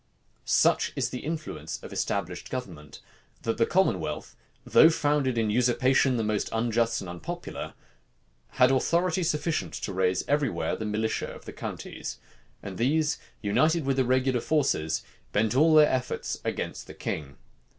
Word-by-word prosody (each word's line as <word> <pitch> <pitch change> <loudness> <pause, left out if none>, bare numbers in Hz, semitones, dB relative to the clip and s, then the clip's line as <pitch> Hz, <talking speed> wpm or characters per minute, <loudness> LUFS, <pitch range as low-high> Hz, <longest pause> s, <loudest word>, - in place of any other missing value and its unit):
Such - - +3
is - - -1
the 125 - -4
influence 155 +2 -5
of - - -8
established - - -2
government, 85 - -7 0.4
that 115 0 -1
the 115 - +4
commonwealth, 175 - 0 0.3
though 160 - +7
founded 145 -5 +1
in 110 -2 +1
usurpation 125 +2 +3
the 115 - 0
most 105 -1 -1
unjust 115 0 +1
and 95 - -7
unpopular, 85 -1 -6 0.8
had 125 0 +5
authority 170 +7 +2
sufficient 160 -1 -1
to 100 - -4
raise 90 0 +1
every 145 -2 +2
where - - -2
the 110 - -5
militia 110 +1 -1
of - - -10
the - - -8
counties; - - -6 0.5
and 95 -2 -7
these, 150 +5 +1 0.2
united 155 +10 +2
with 135 -1 +1
the 130 - +4
regular 130 0 +1
forces, 115 - 0 0.3
bent 105 +1 +2
all 155 +3 +5
their 155 -1 +9
efforts 130 -1 -2
against - - -4
the - - -10
king. 70 -3 -5
125 Hz, 150 wpm, -27 LUFS, 105-150 Hz, 0.8 s, their